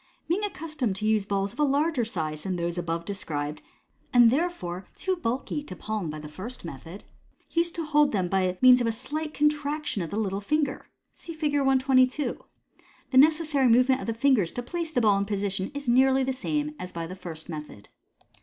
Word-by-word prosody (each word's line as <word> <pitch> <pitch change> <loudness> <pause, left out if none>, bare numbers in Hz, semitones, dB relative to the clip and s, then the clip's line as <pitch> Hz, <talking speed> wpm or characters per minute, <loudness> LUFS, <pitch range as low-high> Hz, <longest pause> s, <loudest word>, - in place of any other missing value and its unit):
Being 365 +6 0
accustomed 310 - -2
to 210 - -4
use 215 -2 +2
balls 200 0 -1
of - - -17
a - - +4
larger 290 -1 +2
size 155 -7 -3
than 185 +2 -3
those 170 0 -2
above 170 -1 -3
described, 150 -7 -4 0.5
and 240 -2 +7
there 330 +7 +2
fore 180 - -7
too 375 -1 0
bulky 270 -2 -2
to 185 - -7
palm 210 -5 -3
by 155 - -5
the 150 0 -8
first 190 +9 -8
method, 165 +5 -9 0.4
he 335 - -1
used 340 0 0
to 330 - -3
hold 295 -1 +3
them 190 -4 0
by 185 0 0
means 250 -1 +8
of 235 - +1
a - - +2
slight 305 +7 -5
contraction 295 -5 0
of 165 - -4
the 205 - -4
little 200 -2 -1
finger. 290 +5 -1 0.3
(See 335 - -9
Fig. 305 -2 -1
122.) 265 0 +2 0.7
The 260 - +2
necessary 305 -2 +4
movement 255 +3 +4
of - - -6
the 230 - -1
fingers 230 -8 +3
to 245 - -4
place 335 +5 -4
the 270 -6 0
ball 205 -3 +4
in 200 - 0
position 200 -2 -2
is 285 -2 -5
nearly 265 +2 +4
the 265 0 -1
same 295 +3 -2
as 180 - -5
by 170 -1 -4
the 180 +3 -7
first 165 -4 -8
method. 150 - -8
240 Hz, 205 wpm, -27 LUFS, 185-295 Hz, 0.7 s, means